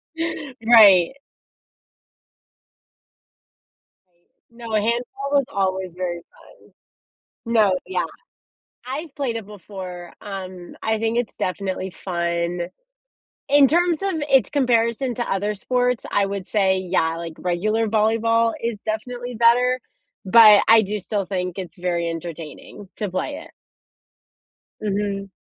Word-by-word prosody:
Yeah, 325 -4 -4
right. 205 -5 +7 3.0
I - - -44 0.4
No, 230 -1 -10
handball 235 +6 -1
was 280 -1 +4
always 190 -2 -1
very 180 -1 -3 1.1
fun. 230 - -9
No, 210 -5 +4
yeah. 380 - -1 0.8
I've 285 +3 -6
played 260 -5 -2
it 225 -3 -6
before, 185 -3 -9
um, 185 -3 -8
I 220 0 0
think 225 +1 0
it's 240 -3 -3
definitely 190 0 -3
fun. 170 -1 -2 0.8
In 285 0 +6
terms 340 +2 +2
of 390 - 0 0.2
its 265 -7 +4
comparison 245 -2 +1
to 240 - -3
other 205 +2 -1
sports, 250 +3 0
I 200 - +2
would 195 -1 -4
say, 190 -3 +2
yeah, 175 -3 0
like, 165 -1 -6
regular 215 +6 0
volleyball 225 +1 +2
is 230 -2 -2
definitely 245 +3 -4
better, 245 +2 +4 0.5
but 215 0 +8
I 225 0 +7
do 210 +1 -3
still 200 +1 -3
think 180 -1 -3
it's 185 -1 -7
very 175 -1 -1
entertaining 165 +3 -8
to 210 - -3
play 185 - -3
it. - - -16 1.3
Mhm. 200 -1 -2
210 Hz, 120 wpm, -22 LUFS, 185-235 Hz, 3.0 s, but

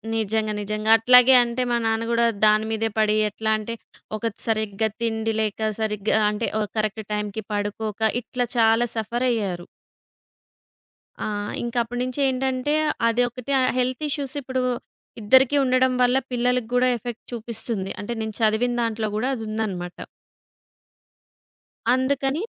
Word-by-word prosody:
నిజంగా. 220 0 0
నిజంగా. 215 +1 -3
అట్లాగే 250 +3 +7
అంటే 235 +1 -3
మా 240 - +3
నాన్న 225 +1 0
గూడా 235 0 +3 0.2
దాని 215 +1 +4
మీదే 225 0 0
పడి 215 0 +3
ఎట్లా 220 +1 -2
అంటే 230 +2 -5 0.4
ఒకటి 225 0 -4
సరిగ్గా 220 -1 0
తిండి 225 -1 -1
లేక, 215 0 -1
సరిగ్గా 215 0 0
అంటే 210 +2 -2
ఓ - - +1 0.2
కరెక్ట్ 215 0 -1
టైమ్‌కి 210 +1 -3
పడుకోక 205 +1 -3 0.2
ఇట్లా 245 +2 -2
చాలా 225 +1 +4
సఫరయ్యారు. 220 -6 -1 1.6
ఆ! - - -2 0.4
ఇంకప్పుడునించేంటంటే 255 +3 -1 0.3
అదొకటి 245 +2 -1 0.3
హెల్త్ 255 +3 -1
ఇష్యూస్ 280 -2 -3
ఇప్పుడూ 260 -1 -2 0.6
ఇద్దరికి 260 +6 +5
ఉండడం 255 0 +3
వల్ల 250 +1 +4
పిల్లలకి 245 -1 +1
గూడా 250 +1 +4
ఎఫెక్ట్ 240 +1 -7
చూపిస్తుంది. 225 -3 -3
అంటే 205 +3 -4
నేను 220 -1 -4
చదివిన 220 +3 +2
దాంట్లో 225 -1 -1
గూడా 220 +4 0
అదుందనమాట. 215 -6 -4 2.0
అందుకని 270 - 0
225 Hz, 120 wpm, -23 LUFS, 215-250 Hz, 2.0 s, అట్లాగే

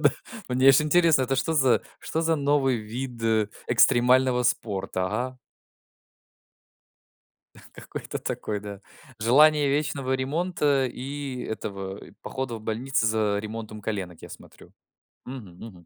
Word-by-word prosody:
Да. 145 - +6 0.4
Мне 130 +1 +2
аж 135 +1 +7
интересно, 155 -1 +4
это 135 +1 0
что 135 +5 0
за 135 -5 +4 0.2
что 160 - -2
за 165 0 +2
новый 140 -3 +2
вид 120 +2 -6 0.5
экстремального 125 +1 +4
спорта? 95 -5 -1
Ага. 125 +6 -3 2.3
Какой-то - - -7
такой, 105 -1 -4
да. 100 -1 -8 0.4
Желание 145 +6 +5
вечного 140 -2 -1
ремонта 145 0 0
и 135 0 -5
этого, 100 -3 -5
и - - -15
похода 130 -2 -4
в - - -10
больницы 115 +2 -1
за 110 -2 +1
ремонтом 110 0 -6
коленок, 95 -5 -4
я - - -9
смотрю. - - -14 0.5
Мгм 120 -9 -9
мгм. 90 -5 -15
125 Hz, 125 wpm, -26 LUFS, 110-140 Hz, 2.3 s, аж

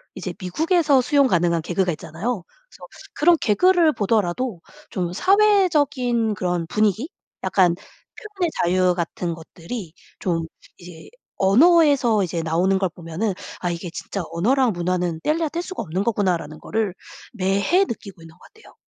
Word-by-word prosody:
이제 180 - -5
미국에서 300 - +2
수용 280 +1 +3
가능한 170 -5 +1
개그가 180 +2 0
있잖아요. 175 +7 -4 0.3
그래서 - - -14 0.3
그런 335 +2 +4
개그를 340 - +4
보더라도 205 -1 -1 0.3
좀 175 -2 -3
사회적인 295 - +2
그런 180 -2 -2
분위기 215 - 0 0.3
약간 180 -3 +3
표현의 380 - -7
자유 180 0 +2
같은 170 0 -3
것들이 165 +3 -8 0.3
좀 165 -3 -1 0.3
이제 175 -3 -13 0.3
언어에서 255 - +4
이제 170 -1 -2
나오는 175 +4 +1
걸 190 -2 0
보면은 175 +5 -3 0.3
'아 175 - -2
이게 170 0 -5
진짜 195 -1 -5
언어랑 245 +7 +2
문화는 175 -2 -2
떼려야 315 0 0
뗄 340 +3 -3
수 375 - -7
없는 185 -2 -2
거구나.'라는 185 -8 -1
거를 215 -4 -2 0.4
매해 200 - +2
느끼고 200 - -7
있는 160 0 -14
것 180 - -26
같아요. 445 - -19
195 Hz, 330 characters per minute, -22 LUFS, 175-275 Hz, 0.4 s, 그런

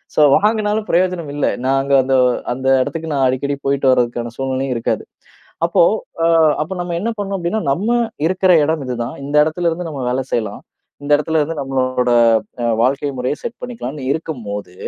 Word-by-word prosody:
So - - +4 0.2
வாங்கினாலும் 215 0 0
பிரயோஜனம் 175 -4 0
இல்ல. 145 - 0 0.2
நாங்க 135 +1 +1
அந்த 135 +1 +1 0.4
அந்த 130 +1 -4 0.2
இடத்துக்கு 160 +2 -5
நான் 135 -2 +2
அடிக்கடி 140 +2 -1
போயிட்டு 140 -1 +2
வரதுக்கான 120 -2 0
சூழ்நிலையும் 135 -1 -2
இருக்காது. 115 - -1 0.6
அப்போ - - +4 0.4
அ - - +4 0.4
அப்போ 160 - -6
நம்ம 175 -1 -3
என்ன 225 - -1
பண்ணும் 200 -1 -2
அப்படின்னா, 180 +5 -1
நம்ம 200 +10 -2 0.4
இருக்கிற 185 +1 +2
இடம் 160 -1 -1
இதுதான். 120 -2 -4
இந்த 145 +1 -4
இடத்தில 170 +2 0
இருந்து 165 +1 -4
நம்ம 140 -4 -5
வேலை 130 +1 -1
செய்யலாம். 110 -3 -2 0.4
இந்த 145 - -3
இடத்தில 160 +2 0
இருந்து 155 +1 -3
நம்மளோட 130 -2 0 0.5
அ - - +1 0.2
வாழ்க்கை 140 +4 +1
முறைய 125 +3 -1
செட் 235 0 -6
பண்ணிக்கலாம்னு 150 - -6
இருக்கும்போது, 110 - -5
145 Hz, 165 wpm, -18 LUFS, 130-175 Hz, 0.6 s, So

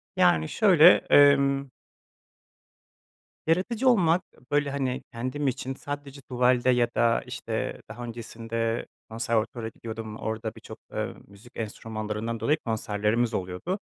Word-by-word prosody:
Yani, 80 -3 +4
şöyle, 180 -6 +7 0.2
emm 140 -1 +5 1.8
yaratıcı 215 +10 +2
olmak, 180 -6 +4
ııı, 125 - -23
böyle, 145 -1 +2
hani, 130 -2 -2
kendim 130 +4 -3
için 130 +1 -2
sadece 145 -1 -7
tuvalde 125 0 +2
ya 120 -1 +4
da, 115 0 +3
işte, - - -4
daha 120 - -7
öncesinde 115 0 -3 0.2
konservatuvara 115 0 -1
gidiyordum. 110 -1 -7
Orada 110 0 -4
birçok, - - -11 0.2
ııı, - - -3
müzik 100 +5 -16
enstrümanlarından 110 0 -4
dolayı 150 +2 +2
konserlerimiz 110 +1 0
oluyordu. 95 - -3
120 Hz, 115 wpm, -27 LUFS, 110-140 Hz, 1.8 s, şöyle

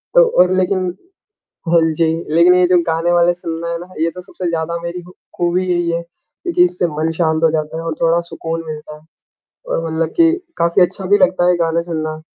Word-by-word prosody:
तो - - +8 0.2
और 180 +1 +3
लेकिन 185 0 +1 0.8
हाँ 170 0 +4
जी, 165 +1 +1 0.3
लेकिन 175 +2 +6
ये 180 0 +4
जो 180 0 +4
गाने 165 +1 0
वाले 175 0 +4
सुनना 170 -1 -5
है 170 - -3
ना, 175 - -10
ये 165 +1 +1
तो 180 - -10
सबसे 180 0 -6
ज़्यादा 170 0 -2
मेरी 170 +1 -5
खू 180 +1 -15 0.2
खूबी 175 +1 0
यही 175 -1 0
है 170 0 -2
क्योंकि 180 - -3
इससे 180 0 +1
मन 160 +1 0
शांत 160 -1 +1
हो 160 - +5
जाता 155 0 -2
है 165 - -4
और 165 -1 -2
थोड़ा 165 +1 +3
सुकून 165 0 -4
मिलता 150 -1 -7
है। - - -17 0.7
और 165 - -1
मतलब 160 0 -1
कि 330 -1 +5 0.3
काफ़ी 170 +3 +2
अच्छा 185 +2 +1
भी 205 - +5
लगता 185 -2 +2
है, 180 - +4
गाने 165 0 +1
सुनना। 155 -2 -4
170 Hz, 215 wpm, -17 LUFS, 165-180 Hz, 0.8 s, तो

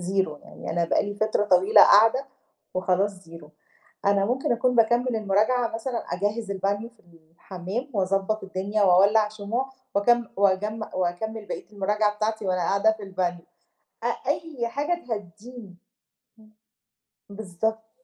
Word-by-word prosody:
zero، 180 -4 -2
يعني - - -8
أنا 170 +1 +1
بقى - - +1
لي 205 0 -5
فترة 215 0 0
طويلة 190 +1 +6
قاعدة 225 +6 +5 0.5
وخلاص 185 +1 0
zero. 165 -2 -11 0.6
أنا 200 0 +3
ممكن 245 +5 0
أكون 250 +2 +1
باكمِّل 240 +1 +3
المراجعة 220 +4 +1
مثلًا 230 +1 -3
أجهِّز 205 +3 -2
البانيو 200 +3 -2
في 235 - -27
الحمّام 175 - -8
وأضبّط 195 +2 0
الدنيا 195 +2 -2
وأولَّع 200 +3 +5
شموع، 220 +5 -4 0.2
وأكم 235 +4 +3
وأجم 200 +3 +1
وأكمِّل 205 +5 -3
بقية - - -7
المراجعة 210 +1 0
بتاعتي 215 0 -2
وأنا 185 -1 0
قاعدة 200 +5 +2
في 220 - -10
البانيو. 185 -3 -3 0.6
أ - - +1 0.2
أي 285 -8 -2
حاجة 300 +8 -2
تهدّيني. 210 0 -8 0.6
إمم. 215 0 -21 0.8
بالضبط. 220 +2 -4
205 Hz, 135 wpm, -25 LUFS, 190-225 Hz, 0.8 s, طويلة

